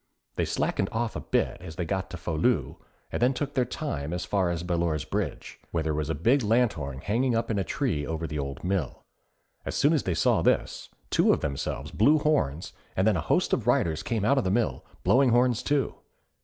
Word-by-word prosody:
They - - 0
slackened 95 - -1
off 115 0 -2
a - - -2
bit - - 0
as 80 -3 -8
they 90 - -2
got 95 +3 -2
to 90 - -6
Folieu 80 -2 0 0.3
and - - -3
then 125 +2 +3
took 145 +1 -3
their 130 -3 +2
time 85 - -4
as 90 0 -3
far 95 -1 +1
as 85 -1 -2
Ballure's 85 -4 -1
Bridge, - - -4
where 80 -1 -1
there 80 -1 -1
was 75 0 -2
a 80 - 0
big 120 - +3
lanthorn 105 - 0
hanging 120 +4 +1
up 115 0 0
in 105 - 0
a - - +1
tree 75 -2 -1
over 80 0 -3
the 75 -1 -4
old 70 -1 -5
mill. 90 -6 -2 0.6
As - - -4
soon 145 +3 +4
as 155 - +2
they 90 - -1
saw 80 - +3
this, - - 0 0.2
two - - +4
of - - +1
Themselves 70 -3 -3
blew 145 +9 +4
horns 115 - 0 0.2
and 95 - +2
then 110 -2 +4
a 85 - 0
host 80 - +1
of - - 0
riders 80 -2 +2
came 110 -4 -1
out 140 +4 +4
of - - 0
the 95 - 0
mill, 115 +4 0 0.2
blowing 130 +1 +4
horns 120 0 +3
too. 145 -3 0
95 Hz, 220 wpm, -27 LUFS, 80-120 Hz, 0.6 s, soon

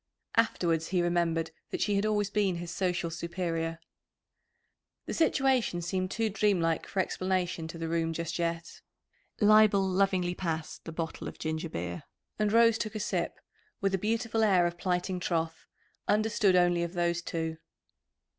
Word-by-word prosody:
Afterwards 170 -8 +2
he 185 - 0
remembered 165 -2 0 0.2
that - - -3
she 205 - +1
had 200 +2 +1
always 210 -1 0
been 200 -4 +1
his 170 0 -5
social 180 -3 -1
superior. 170 -1 -3 1.3
The - - -4
situation 265 - +2
seemed 185 +2 -1
too 225 +3 0
dreamlike 195 -6 +1
for 190 - +1
explanation 185 -2 -1
to 165 - -8
the 165 0 -3
room 165 0 0
just 170 +1 -3
yet. 170 0 -3 0.6
Leibel 210 -2 +6
lovingly 185 -1 +1
passed 160 -3 -4
the 165 - -5
bottle 160 0 -4
of - - -8
ginger 160 +1 -3
beer 85 - -5 0.3
and 210 -1 +2
Rose 230 0 +5
took 215 0 -3
a - - -2
sip, 205 - -2 0.4
with 195 0 0
a 190 - +1
beautiful 225 +2 0
air 185 -5 +4
of 175 0 -3
plighting 180 0 -1
troth, 165 -2 -2 0.4
understood 210 -2 +3
only 175 -1 +4
of 170 0 -3
those 170 -1 0
two. 160 -1 -3
180 Hz, 155 wpm, -30 LUFS, 165-205 Hz, 1.3 s, Leibel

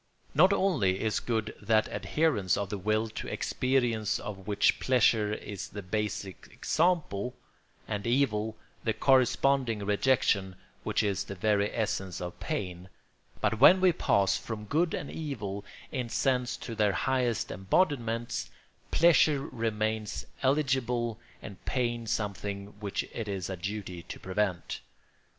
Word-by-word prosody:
Not 180 +7 +6
only 140 - +2
is 110 0 0
good 110 -2 -2
that 110 -1 +3
adherence 125 - +1
of 100 -2 -3
the 105 - -2
will 110 +3 +1
to 110 - -6
experience 120 -5 0
of 95 -3 -7
which 105 -1 +3
pleasure 115 -4 +3
is 100 -2 -5
the 100 0 -7
basal 105 0 -2 0.2
example, 155 - 0 0.5
and 105 +1 -3
evil 110 -4 +1 0.3
the 110 - +1
corresponding 130 -2 +3
rejection 100 -3 +2 0.3
which - - 0
is 100 -2 0
the 100 - -6
very 105 +1 +1
essence 95 -5 -2
of 90 0 -6
pain, 90 -1 -4 0.5
but 105 +1 +1
when 180 +8 +8
we 185 -1 +5
pass 100 - +2
from 110 -2 -5
good 160 +9 +1
and 145 - -5
evil 105 -11 -4 0.3
in 125 -4 -3
sense 125 0 0
to 115 - -7
their 105 -2 +2
highest 125 -3 0
embodiments, 115 - 0 0.4
pleasure 155 -3 +5
remains 110 -2 -2 0.2
eligible 130 -4 +1 0.2
and 100 -2 -10
pain 120 -2 -1
something 100 -2 -3
which 100 -2 -2
it 115 -2 -4
is 95 -2 -3
a - - -2
duty 95 -1 -5
to 85 - -9
prevent. 95 -1 -2
110 Hz, 135 wpm, -29 LUFS, 100-130 Hz, 0.5 s, when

